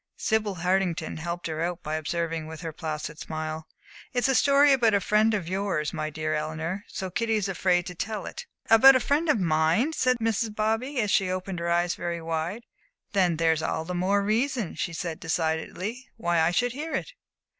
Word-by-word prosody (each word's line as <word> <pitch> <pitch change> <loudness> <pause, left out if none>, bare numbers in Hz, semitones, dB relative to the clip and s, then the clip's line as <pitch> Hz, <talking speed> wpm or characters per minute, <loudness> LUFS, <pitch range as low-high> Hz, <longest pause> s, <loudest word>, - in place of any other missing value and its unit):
Sibyl 215 -3 0
Hartington 180 -2 0
helped 170 +2 -4
her 160 -1 -3
out 175 +1 -2
by 155 - -3
observing, 160 +1 -2
with 160 -1 -8
her 165 -2 -5
placid 155 -1 -5
smile: 155 0 -5 0.5
"It's 245 -1 +2
a 265 - +3
story 280 +2 +5
about 230 -5 +3
a - - +4
friend 210 +2 +3
of 185 -5 -3
yours, 185 -5 -1
my 155 0 -2
dear 155 0 -2
Eleanor, 160 +5 -3
so 190 -1 -5
Kitty 225 +4 0
is 205 -2 0
afraid 180 -2 +1
to 180 - -6
tell 205 +2 -4
it." - - -7 0.2
"About 260 +4 +8
a - - +5
friend 300 +6 +1
of 265 - +4
mine?" 165 - +2
said 255 -4 +2
Mrs. 225 -1 -1
Bobby, 225 +6 0
and 210 -3 +1
she 190 -1 +3
opened 185 0 -3
her 170 0 -2
eyes 175 +1 +2
very 170 -1 -3
wide. 165 +7 -3 0.5
"Then 180 -4 +2
there's 160 -1 +2
all 160 0 -2
the 180 - -4
more 195 +3 +1
reason," 230 0 0
she - - -3
said, 165 -1 -4
decidedly, 170 +9 -2
"why 175 -5 +1
I 160 +1 +4
should 245 +8 +1
hear 300 +6 -5
it." - - -4
180 Hz, 200 wpm, -26 LUFS, 160-220 Hz, 0.5 s, About